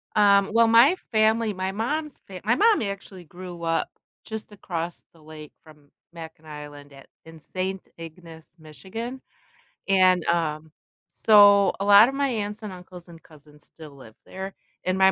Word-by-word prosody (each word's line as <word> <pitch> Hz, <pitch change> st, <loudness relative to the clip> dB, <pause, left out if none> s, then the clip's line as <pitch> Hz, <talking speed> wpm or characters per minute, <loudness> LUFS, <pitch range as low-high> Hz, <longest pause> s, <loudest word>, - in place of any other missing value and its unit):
Um, 200 Hz, -1 st, +4 dB
well, 230 Hz, 0 st, +4 dB
my 235 Hz, +10 st, +6 dB, 0.2 s
family 220 Hz, 0 st, +2 dB
my 185 Hz, 0 st, -3 dB
mom's 290 Hz, +8 st, -4 dB
fa 185 Hz, -2 st, -10 dB
my 225 Hz, +4 st, +2 dB
mom 435 Hz, -, +3 dB
actually 200 Hz, -3 st, -7 dB
grew 175 Hz, +1 st, -10 dB
up 165 Hz, 0 st, -1 dB, 0.4 s
just 220 Hz, -1 st, -8 dB
across 175 Hz, -4 st, -6 dB
the 165 Hz, -, -22 dB
lake 155 Hz, -1 st, -12 dB
from 150 Hz, -3 st, -20 dB, 0.2 s
Mackinac 160 Hz, -1 st, -12 dB
Island 145 Hz, -1 st, -11 dB
at 135 Hz, 0 st, -16 dB, 0.2 s
in 160 Hz, 0 st, -14 dB
Saint 185 Hz, +4 st, -5 dB
Ignace, 165 Hz, -1 st, -12 dB
Michigan. 190 Hz, -, -8 dB, 0.7 s
And, 185 Hz, -3 st, +3 dB
um, 160 Hz, -2 st, -2 dB, 0.4 s
so, 205 Hz, -2 st, +5 dB
a 200 Hz, -, -2 dB
lot 205 Hz, +2 st, +8 dB
of 275 Hz, -, -6 dB
my 280 Hz, -1 st, 0 dB
aunts, 210 Hz, -2 st, -4 dB
and 210 Hz, -, -6 dB
uncles, 180 Hz, -1 st, -13 dB
and 165 Hz, -1 st, -14 dB
cousins 150 Hz, -1 st, -19 dB
still 155 Hz, -2 st, -14 dB
live 130 Hz, -6 st, -16 dB
there, 190 Hz, +1 st, -8 dB, 0.3 s
and 185 Hz, +1 st, 0 dB
my 190 Hz, 0 st, +5 dB
185 Hz, 165 wpm, -24 LUFS, 160-210 Hz, 0.7 s, lot